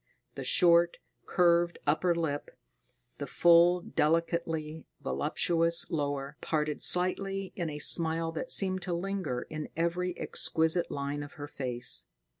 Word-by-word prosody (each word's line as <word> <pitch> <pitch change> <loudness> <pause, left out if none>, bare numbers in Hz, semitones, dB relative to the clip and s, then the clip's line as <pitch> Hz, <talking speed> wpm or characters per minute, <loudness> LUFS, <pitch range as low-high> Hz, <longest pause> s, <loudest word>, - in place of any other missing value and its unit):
The - - -7
short, 170 -1 +4 0.3
curved 175 -1 +2
upper 170 +4 +1
lip, 155 -4 -3 0.7
the - - -5
full, 175 +1 +4
delicately 160 -1 -2
voluptuous 165 +4 +1
lower, 145 -2 -3
parted 150 -1 -2
slightly 195 +2 0
in 170 -3 -3
a 150 - -6
smile 165 +2 +2
that 165 +10 -4
seemed 185 -1 +4
to 175 -1 -3
linger 185 -8 -3
in 155 -1 -7
every 175 +2 -1
exquisite 160 +2 0
line 140 +1 -4
of 145 -1 -9
her 145 0 -8
face. 125 -4 -1
165 Hz, 125 wpm, -29 LUFS, 150-175 Hz, 0.7 s, short